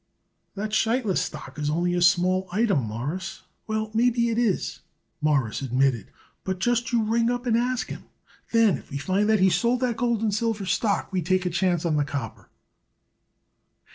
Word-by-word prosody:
"That 210 +2 -4
Sheitlis 225 -2 +1
stock - - -7
is 150 0 -1
only 175 +3 0
a 175 - 0
small 185 +1 +3
item, 195 - +1
Mawruss." 140 - -5 0.2
"Well, 215 0 -2
maybe 235 +1 +2
it 230 0 0
is," 225 -6 0 0.4
Morris 140 -8 +1
admitted, 130 -3 +1 0.4
"but 190 -1 -2
just 240 +5 0
you 235 -2 +2
ring 230 +2 +1
up 245 +1 -2
and 235 -2 +2
ask 245 +1 0
him. - - -8 0.5
Then, 225 - +4
if - - -18
we 140 - -4
find 190 +9 0
that 215 -1 +4
he 190 0 +5
sold 240 +5 +2
that 245 -3 0
gold 235 -3 0
and 215 -2 +1
silver 220 -1 -1
stock 200 +1 0
we 185 - +1
take 185 +2 +1
a 180 - 0
chance 175 -1 +1
on 155 -3 +1
the 145 - +2
copper." 140 -6 -6
195 Hz, 180 wpm, -25 LUFS, 170-230 Hz, 0.5 s, he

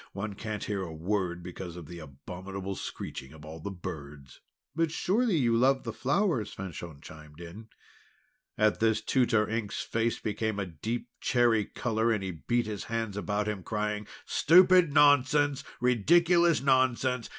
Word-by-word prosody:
One 100 +1 -4
can't 105 +1 -5
hear 100 -2 -2
a 90 -3 -5
word 90 +1 -2
because 90 -1 -7
of 85 -2 -9
the 85 +3 -9
abominable 90 +7 -7
screeching 65 -6 -7
of 80 +1 -10
the - - -3
birds!" 75 -7 -9 0.3
"But 165 0 +1
surely 205 +3 +1
you 120 -5 +2
love 130 +3 +3
the 115 - -5
flowers?" 145 - 0
Fanchon 85 -5 -8
chimed 75 0 -13
in. 90 +6 -10 0.9
At 110 -1 +2
this 110 -1 +2
Tutor 120 -5 +2
Ink's 110 -2 -3
face 115 0 -1
became 110 0 -2
a 100 - -2
deep 110 +9 -5
cherry 120 -4 +2
colour, 115 -1 -1
and 105 -3 0
he 95 - -3
beat 120 +8 -1
his 105 -2 -5
hands 115 -3 -3
about 105 0 -2
him, 105 -3 -3
crying: 105 +1 -3 0.2
"Stupid 180 -1 +5
nonsense! 145 0 +4 0.2
Ridiculous 170 - +3
nonsense! 130 -2 +2
110 Hz, 150 wpm, -29 LUFS, 95-125 Hz, 0.9 s, Stupid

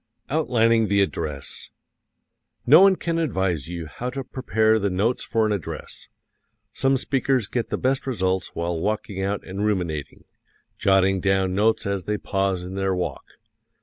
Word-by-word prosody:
Outlining 115 -7 +3
the 100 0 +2
Address 75 -7 -4 1.0
No 150 +8 +8
one 195 -1 +7
can 165 -2 -2
advise 95 - -1
you 85 -1 -5
how 120 - -5
to 135 +1 -5
prepare 110 -3 +1
the 100 -1 0
notes 100 +7 0
for 110 -1 +1
an 110 - 0
address. 100 -7 -5 0.7
Some 135 0 +2
speakers 130 -2 0
get 120 +3 -3
the - - -1
best 135 +1 0
results 95 -6 -1
while 85 0 -2
walking 105 0 -2
out 100 +1 -2
and 95 +2 -4
ruminating, 90 -8 -2 0.6
jotting 95 -1 +3
down 95 -1 +1
notes 110 +3 +2
as 100 -2 -2
they 105 0 -1
pause 95 -3 -1
in 90 +1 -7
their 95 -1 0
walk. 90 - -3
100 Hz, 155 wpm, -24 LUFS, 95-115 Hz, 1.0 s, No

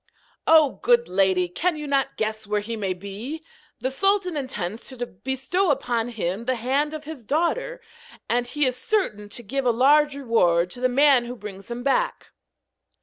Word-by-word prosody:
'Oh! 315 -4 +5
good 240 0 +3
lady, 185 -1 +2
can 315 - -1
you 300 - -5
not 275 -1 0
guess 215 -1 -2
where 210 0 0
he 230 +3 -5
may 200 -4 -2
be? 200 - -6 0.4
The 260 - -1
sultan 390 +3 +1
intends 225 -7 -4
to 250 -2 -4
bestow 265 - -1
on 235 -1 0
him 220 -2 -3
the 255 +1 +1
hand 275 +6 0
of 305 - -7
his 305 -5 -8
daughter, 425 - -1 0.5
and 245 +1 0
he 295 +3 0
is 255 -1 0
certain 220 - -1
to 240 +3 -7
give 270 +6 -2
a - - +5
large 285 +5 +4
reward 180 -10 +2
to 245 - -7
the 255 - +3
man 270 -1 +4
who 245 +1 -6
brings 200 -3 -9
him 240 +1 -5
back.' - - 0
250 Hz, 180 wpm, -24 LUFS, 215-295 Hz, 0.5 s, Oh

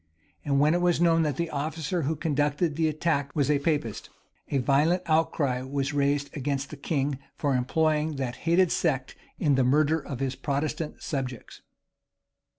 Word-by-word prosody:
And 140 -2 +1
when 150 +2 +4
it 175 - +1
was 175 -2 +2
known 165 -1 +4
that 150 -4 0
the 170 -1 -2
officer 155 +3 -2
who 155 +2 -1
conducted 150 +1 0
the 160 0 +2
attack 150 -2 -1
was 145 -1 +2
a 145 - +2
Papist, 140 -8 -2 0.4
a 140 - +1
violent 145 +8 +2
outcry 155 -5 +1
was 135 +2 -2
raised 140 0 0
against 140 -1 -2
the - - -6
king 140 -1 -1 0.2
for 145 -2 0
employing 155 +4 +1
that 130 -3 -3
hated 175 +1 +4
sect 135 -6 0 0.2
in 145 -3 +2
the 130 -1 +3
murder 150 +5 +3
of 140 -3 -7
his 135 -1 -1
Protestant 150 +3 -3
subjects. 130 -5 -5
145 Hz, 165 wpm, -27 LUFS, 140-160 Hz, 0.4 s, when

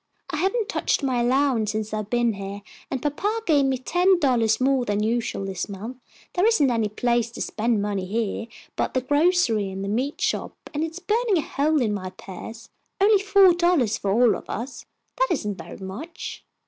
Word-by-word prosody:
I - - -2
haven't 390 +6 0
touched - - 0
my 255 -3 +1
allowance 245 -4 +2
since 215 0 -3
I've 215 -1 -3
been 240 -1 +2
here, 200 0 -7 0.3
and 260 - -3
papa 405 +10 -1
gave 290 -4 +4
me 265 -1 +1
ten 360 +8 +3
dollars 235 -7 +2
more 265 0 +2
than 210 -2 0
usual 225 -3 -1
this 190 0 -4
month. 215 +6 -7 0.4
There 360 - +1
isn't 295 - +4
any 225 -3 +1
place 235 +2 0
to 235 - -10
spend 220 -2 0
money 200 -3 -2
here 225 +2 -2 0.3
but - - +1
at - - -9
the 255 - +2
grocery 290 - +2
and 190 0 -5
meat 280 +6 -2
shop, - - -1 0.2
and 300 +1 -1
it's 325 +1 -4
burning 420 +2 +1
a - - +2
hole 295 0 +1
in 215 -3 0
my 185 -2 -4
purse. 210 +5 -10 0.3
Only 405 0 +5
four 395 -2 +6
dollars 335 - +2
for 200 - -2
all 230 +3 +4
of - - -9
us. 240 +2 -6 0.3
That - - +4
isn't 210 - -2
very - - -9
much." 220 - -7
245 Hz, 195 wpm, -24 LUFS, 215-320 Hz, 0.4 s, four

